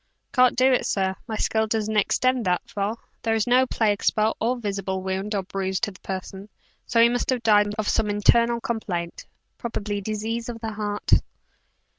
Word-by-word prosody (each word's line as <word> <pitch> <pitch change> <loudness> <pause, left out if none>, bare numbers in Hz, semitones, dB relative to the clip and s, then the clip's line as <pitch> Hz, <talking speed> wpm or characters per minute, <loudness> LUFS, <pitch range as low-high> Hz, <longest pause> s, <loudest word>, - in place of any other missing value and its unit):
"Can't 250 -2 +4
do 260 +1 +5
it, 250 - +1
sir; 190 -1 0
my 220 - -3
skill 220 0 +1
doesn't 220 0 -1
extend 255 +4 +2
that 180 -1 0
far. 205 +3 -2 0.2
There 225 -1 +1
is 220 - +1
no 255 +2 +4
plague 210 -4 0
spot 215 0 +2
or 240 +3 +1
visible 195 -4 -3
wound 190 +3 -2
or 195 - -1
bruise 190 0 -2
on 205 - -7
the 185 - -17
person; 190 +1 -6 0.4
so 230 - +2
he 230 - +8
must 245 +1 -1
have 250 -2 0
died 210 -2 +4
of 215 -1 -2
some 210 - +1
internal 235 +3 +3
complaint 185 -8 -4 0.3
probably 210 -4 -3
disease 220 +3 -3
of 230 -1 -6
the 225 -1 -4
heart." 205 -1 -4
215 Hz, 185 wpm, -24 LUFS, 200-235 Hz, 0.4 s, he